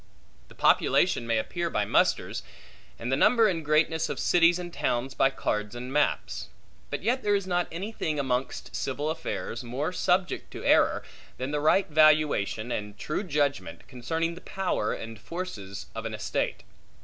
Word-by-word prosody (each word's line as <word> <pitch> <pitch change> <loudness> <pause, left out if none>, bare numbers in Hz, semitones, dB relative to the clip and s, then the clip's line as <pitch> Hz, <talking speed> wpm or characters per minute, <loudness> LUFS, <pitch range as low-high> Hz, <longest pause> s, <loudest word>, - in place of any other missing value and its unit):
The - - -17
population 115 - +3
may 115 -1 +2
appear 170 +10 -2
by - - 0
musters; - - +1 0.6
and 120 +3 -4
the - - +4
number 225 - +5
and 170 -5 -1
greatness 155 +2 +2
of - - -3
cities 175 0 +4
and 175 -1 -7
towns 130 -2 -1
by 135 - +3
cards 105 -4 -2
and 125 +2 -6
maps. 150 - 0 0.4
But - - -4
yet 245 +5 +1
there 205 -1 +2
is 200 -1 -1
not 175 -1 0
any 190 +6 -4
thing 155 -8 -2
amongst 130 -1 -2
civil 145 +4 -2
affairs 160 -6 -4
more 135 +8 -2
subject 180 0 0
to - - -7
error, - - +4 0.3
than 130 +2 -3
the 150 - 0
right 190 +6 +4
valuation 150 - +3
and 105 -1 -4
true 155 - -2
judgment 145 -5 -1
concerning 160 +7 -2
the 175 - -11
power 185 - -1
and 115 -1 -6
forces 110 - -6
of 115 0 -4
an 110 - -5
estate. 105 - -2
150 Hz, 170 wpm, -27 LUFS, 120-175 Hz, 0.6 s, number